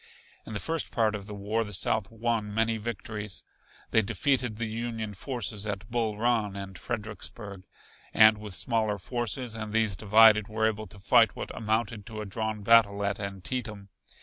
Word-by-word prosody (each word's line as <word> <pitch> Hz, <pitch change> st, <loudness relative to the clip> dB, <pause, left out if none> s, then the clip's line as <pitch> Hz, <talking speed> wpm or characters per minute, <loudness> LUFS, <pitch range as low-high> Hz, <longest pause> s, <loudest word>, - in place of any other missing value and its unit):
In -, -, -6 dB
the 105 Hz, -, -2 dB
first 165 Hz, 0 st, -1 dB
part 110 Hz, -2 st, +1 dB
of 100 Hz, -1 st, -5 dB
the 105 Hz, -, -6 dB
war 105 Hz, +3 st, -1 dB
the 105 Hz, -1 st, -8 dB
South 100 Hz, +3 st, 0 dB
won 115 Hz, -2 st, -1 dB
many 115 Hz, +1 st, +1 dB
victories. 105 Hz, -2 st, -5 dB, 0.5 s
They 110 Hz, -, +5 dB
defeated 125 Hz, +2 st, 0 dB
the 115 Hz, +2 st, -3 dB
Union 110 Hz, -1 st, -4 dB
forces 105 Hz, -2 st, -3 dB
at 100 Hz, +1 st, -4 dB
Bull 115 Hz, -3 st, 0 dB
Run 110 Hz, -3 st, +1 dB
and 100 Hz, -1 st, -7 dB
Fredericksburg, 105 Hz, -2 st, -6 dB, 0.4 s
and 110 Hz, -1 st, +6 dB
with 105 Hz, -3 st, -6 dB
smaller 110 Hz, -1 st, +1 dB
forces 120 Hz, +3 st, -3 dB
and 110 Hz, -1 st, -5 dB
these 110 Hz, -3 st, +2 dB
divided 105 Hz, +1 st, +6 dB
were 110 Hz, +1 st, 0 dB
able 110 Hz, -1 st, -1 dB
to 105 Hz, -, -14 dB
fight 115 Hz, +3 st, +4 dB
what -, -, -6 dB
amounted 110 Hz, -1 st, -1 dB
to 110 Hz, -2 st, -7 dB
a 105 Hz, -, -4 dB
drawn 110 Hz, +1 st, -3 dB
battle 105 Hz, -2 st, +5 dB
at 100 Hz, -1 st, -1 dB
Antietam. 100 Hz, +1 st, -5 dB
110 Hz, 175 wpm, -28 LUFS, 105-115 Hz, 0.5 s, and